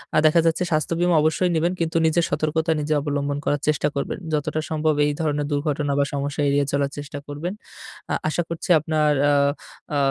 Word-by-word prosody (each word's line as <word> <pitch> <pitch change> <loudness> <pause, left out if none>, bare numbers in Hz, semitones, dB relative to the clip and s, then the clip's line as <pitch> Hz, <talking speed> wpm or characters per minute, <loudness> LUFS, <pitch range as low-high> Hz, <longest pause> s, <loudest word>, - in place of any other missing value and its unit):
আ - - +4
দেখা 155 +2 +5
যাচ্ছে 165 +2 +2
স্বাস্থ্য 155 +2 +1
বীমা 175 -1 +3
অবশ্যই 160 +3 +2
নিবেন। 170 +2 +1
কিন্তু 165 0 0
নিজের 165 +1 +2
সতর্কতা 160 +2 0
নিজে 150 +1 -1
অবলম্বন 145 -1 -2
করার 145 -1 0
চেষ্টা 150 -1 +2
করবেন। 140 - -2 0.2
যতটা 150 +1 -1
সম্ভব 155 0 +1
এই 145 - +1
ধরনের 150 -2 0
দুর্ঘটনা 145 0 -1
বা - - +4
সমস্যা 140 +1 -2
এড়িয়ে 140 0 +2
চলার 140 0 0
চেষ্টা 145 0 -6
করবেন। 150 +6 -4 0.6
আ - - +1
আশা 155 +3 0
করছি 170 +1 -5
আপনার 155 -1 +1 0.2
আ - - +3 0.6
আ - - +2
150 Hz, 190 wpm, -23 LUFS, 145-160 Hz, 0.6 s, দেখা